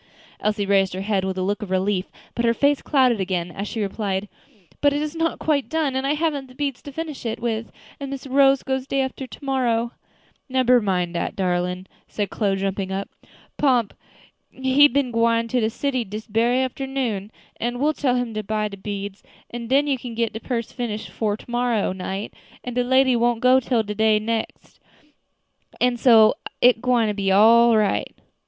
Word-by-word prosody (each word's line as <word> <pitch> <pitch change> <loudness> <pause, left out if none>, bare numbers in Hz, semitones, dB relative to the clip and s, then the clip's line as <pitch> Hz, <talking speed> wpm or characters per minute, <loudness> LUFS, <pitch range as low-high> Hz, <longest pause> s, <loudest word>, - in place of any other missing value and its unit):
Elsie 210 -1 0
raised 195 -2 +2
her 190 - -4
head 195 -1 0
with 190 0 -3
a 185 - -1
look 205 +2 -1
of 210 - -6
relief, 190 0 0 0.3
but 235 - -2
her 230 0 +3
face 285 +2 +2
clouded 255 -6 +2
again, 180 -2 -2
as 200 +3 -5
she 225 - -5
replied, 200 0 -2 0.5
"But 285 -1 +4
it 290 - -1
is 305 +1 -5
not 330 0 0
quite 290 -4 0
done, 310 -4 0
and 265 +1 -1
I 290 - +1
haven't 295 -4 -1
the 255 - -17
beads 280 -2 -3
to 285 - -9
finish 310 0 -6
it 230 -1 -3
with, 230 -1 -3 0.3
and 280 -1 -5
Miss 275 0 -6
Rose 275 0 +4
goes 265 0 -2
day 275 0 0
after 265 0 -4
to 280 - -12
morrow." 240 -3 0 0.6
"Nebber 255 -1 +4
mind 180 -4 -1
dat, 170 - -3
darlin'," 180 0 -1 0.2
said 205 -3 -3
Chloe, 200 -3 0
jumping 195 0 -2
up; 195 +1 -3 0.5
"Pomp 250 -7 +2 0.6
he 265 +2 +4
been 280 -3 0
gwine 230 0 +2
to 250 - +1
de 220 -1 +1
city 260 +1 -1
dis 215 +1 -7
berry 235 +4 +1
afternoon, 255 -6 -3 0.3
an' 240 +1 -2
we'll 295 +4 +1
tell 260 -4 0
him 245 -2 -2
to 215 - -2
buy 215 0 -1
de 200 - -9
beads, 200 0 -6 0.3
an' 235 -1 -6
den 275 +4 +3
you 275 -3 0
can 235 -1 -7
get 230 -1 -1
de 220 - -5
purse 235 -1 -3
finished 225 -3 -5
'fore 210 -2 -1
to - - -15
morrow 240 -4 0
night, 190 +2 -5 0.3
an' 250 - -5
de 245 +1 +1
lady 260 +1 +4
don't 240 0 +2
go 255 +2 +5
till 245 -3 0
de 215 +1 +2
next 225 +1 -4
day, 300 -1 -31
an' 250 0 +2
so 225 -3 +6 0.3
it 245 -2 +5
gwine 245 -3 +2 0.2
all 225 +4 +6
come 225 - +4
right 205 - 0
yet." - - -33
235 Hz, 200 wpm, -23 LUFS, 205-260 Hz, 0.6 s, so